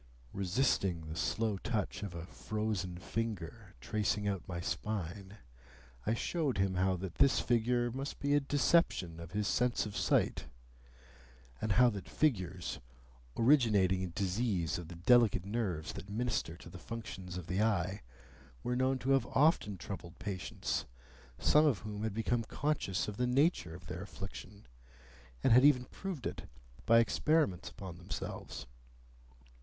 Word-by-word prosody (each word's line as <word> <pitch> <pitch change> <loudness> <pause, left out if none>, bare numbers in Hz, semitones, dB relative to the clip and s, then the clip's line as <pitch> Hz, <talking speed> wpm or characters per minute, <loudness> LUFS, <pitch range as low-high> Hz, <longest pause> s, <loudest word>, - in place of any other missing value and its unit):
'" - - -26
Resisting 95 -3 +1
the 80 0 -7
slow 110 +4 0
touch 105 0 -2
of 100 -4 -5
a 85 0 -5
frozen 105 -3 -3
finger 105 -2 -4
tracing 105 +7 0
out 100 -3 -1
my 90 -2 -4
spine, 100 +1 -4 0.7
I 110 - +3
showed 150 - -1
him 95 -1 +2
how 95 +1 +2
that 90 -2 -6
this 135 -3 +5
figure 120 0 +1
must 135 +3 -5
be 140 0 +1
a 145 - +6
deception 140 - +2
of 85 +2 -9
his 105 0 0
sense 125 -1 +1
of 105 -1 -6
sight; - - +1 1.1
and 110 -2 +1
how 125 +3 +6
that 100 -3 -7
figures, 95 - 0 0.6
originating 110 -8 +4
in 90 -2 -3
disease 95 -4 0
of 85 - -8
the 85 - -9
delicate 105 0 +4
nerves 100 -7 -2
that 100 - -8
minister 110 -6 -1
to 85 - -12
the 90 - -9
functions 95 -5 -6
of 90 - -6
the 90 +4 0
eye, 100 -3 +1 0.6
were 125 - 0
known 130 +1 +2
to 130 +1 -1
have 135 -3 +3
often 135 - +3
troubled 85 0 -7
patients, 95 -3 -3 0.5
some 150 +1 +5
of 135 -8 +3
whom 105 -1 -5
had 110 -2 -2
become 115 +1 0
conscious 135 -6 -1
of 105 -1 -5
the 125 - +1
nature 125 - +2
of 85 - -12
their 85 - -5
affliction, 100 0 -8 0.8
and - - +5
had 125 +2 +7
even 135 -4 +5
proved 180 - -6
it - - -5 0.4
by 115 - +7
experiments 115 - +2
upon 90 -3 -9
themselves. 90 - -6
105 Hz, 155 wpm, -33 LUFS, 90-120 Hz, 1.1 s, had